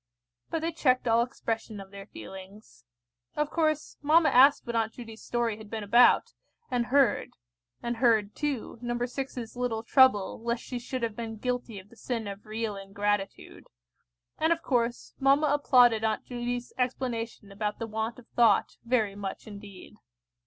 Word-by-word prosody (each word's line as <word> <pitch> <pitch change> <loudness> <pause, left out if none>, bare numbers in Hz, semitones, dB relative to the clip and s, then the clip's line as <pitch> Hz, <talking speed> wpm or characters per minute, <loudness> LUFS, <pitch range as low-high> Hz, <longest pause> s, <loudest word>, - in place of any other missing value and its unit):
But 325 - -2
they 330 +1 -1
checked 255 -6 +1
all 230 0 +4
expression 225 -3 -4
of 195 0 -11
their 200 0 -10
feelings. 190 - -12 0.5
Of 300 0 -1
course, 310 -2 0
mamma 315 +3 +5
asked 275 +3 +6
what 235 -1 -4
Aunt 225 -1 0
Judy's 225 -2 -10
story 235 -3 -1
had 220 -1 -12
been 220 -1 -4
about, 235 +4 +5 0.4
and 240 -1 0
heard; 270 -4 +2 0.5
and 235 0 -2
heard, 220 -4 +3
too, 280 -6 -3
No. 240 0 -2
6's 245 -1 -4
little 240 -3 -2
trouble 235 -6 +4
lest 235 +1 -2
she 250 - -5
should 255 +1 -5
have 225 -2 -2
been 225 -1 -5
guilty 245 -1 -3
of 190 +1 -11
the 235 - -17
sin 230 -2 -4
of 200 +2 -8
real 215 -1 -3
ingratitude; 200 0 -3 0.7
and, 320 +1 +2
of 335 0 +1
course, 240 -2 -1
mamma 275 +2 +4
applauded 250 -6 +4
Aunt 220 -1 -1
Judy's 245 0 -4
explanation 235 -4 -3
about 210 +1 -3
the 230 - -4
want 220 +1 -3
of 250 - -14
thought, 230 -4 +3
very 230 -4 +1
much 200 -1 -6
indeed. 205 -1 -11
235 Hz, 165 wpm, -28 LUFS, 215-250 Hz, 0.7 s, asked